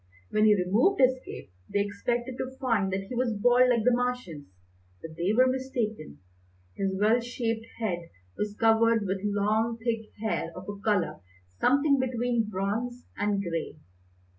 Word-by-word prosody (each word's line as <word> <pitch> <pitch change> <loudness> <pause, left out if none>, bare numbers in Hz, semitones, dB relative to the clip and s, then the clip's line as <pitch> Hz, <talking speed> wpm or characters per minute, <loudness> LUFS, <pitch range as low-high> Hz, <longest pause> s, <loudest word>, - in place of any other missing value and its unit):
When 215 0 +3
he 210 -1 +6
removed 210 - +2
his 260 0 +4
cape 90 - -10 0.2
they 200 - +2
expected 240 +5 -2
to 260 0 -5
find 225 -8 +1
that 190 +1 -2
he 195 - -8
was 240 -2 0
bald 245 +3 +5
like 235 -3 +2
the 250 +2 +4
Martians, 245 - -2 0.5
but 160 -1 -9
they 175 +4 0
were 250 +4 +5
mistaken. 255 - -2 0.6
His 190 -1 -1
well 220 +4 +4
shaped 230 -2 -3
head 175 -7 -3 0.3
was 210 0 -3
covered 225 -1 +4
with 190 0 -1
long, 210 +3 +1
thick 225 -1 -3
hair 220 -6 -1
of 185 +1 -9
a 205 -1 -6
colour 205 -4 0 0.4
something 280 +1 +3
between 245 -3 0
bronze 215 +6 -3
and 205 -1 0
grey. 165 -3 -4
225 Hz, 160 wpm, -28 LUFS, 200-245 Hz, 0.6 s, he